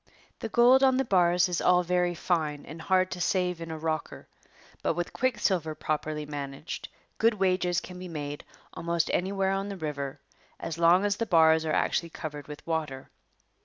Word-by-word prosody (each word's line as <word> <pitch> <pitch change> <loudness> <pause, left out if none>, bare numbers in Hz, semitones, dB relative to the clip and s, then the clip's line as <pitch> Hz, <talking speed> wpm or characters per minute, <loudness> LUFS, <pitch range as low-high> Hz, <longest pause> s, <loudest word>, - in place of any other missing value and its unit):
The 225 - -4
gold 245 +4 +6
on 260 -1 +4
the 265 - +1
bars 180 -3 +3
is 175 -1 -2
all 180 0 +4
very 180 0 +1
fine 155 -4 -1
and 160 +2 -9
hard 185 +1 +2
to 180 - -4
save 180 -1 0
in 165 - -6
a 160 - -4
rocker, 155 -1 -4 0.5
but - - 0
with 175 0 -3
quicksilver 190 - 0
properly 150 0 -3
managed, 145 0 -6 0.3
good 225 0 +4
wages 185 -3 +1
can 180 -1 -10
be 185 - -7
made 145 -3 -5 0.3
almost 170 -1 -1
anywhere 190 +1 0
on 195 +1 -2
the 200 - -5
river 145 -3 -4 0.4
as 165 0 -5
long 175 +4 +5
as 205 0 +1
the 230 - -2
bars 160 -3 +5
are 155 - -1
actually 170 +2 +1
covered 150 -3 -7
with 150 -1 -10
water. 155 -5 -3
175 Hz, 180 wpm, -28 LUFS, 155-185 Hz, 0.5 s, gold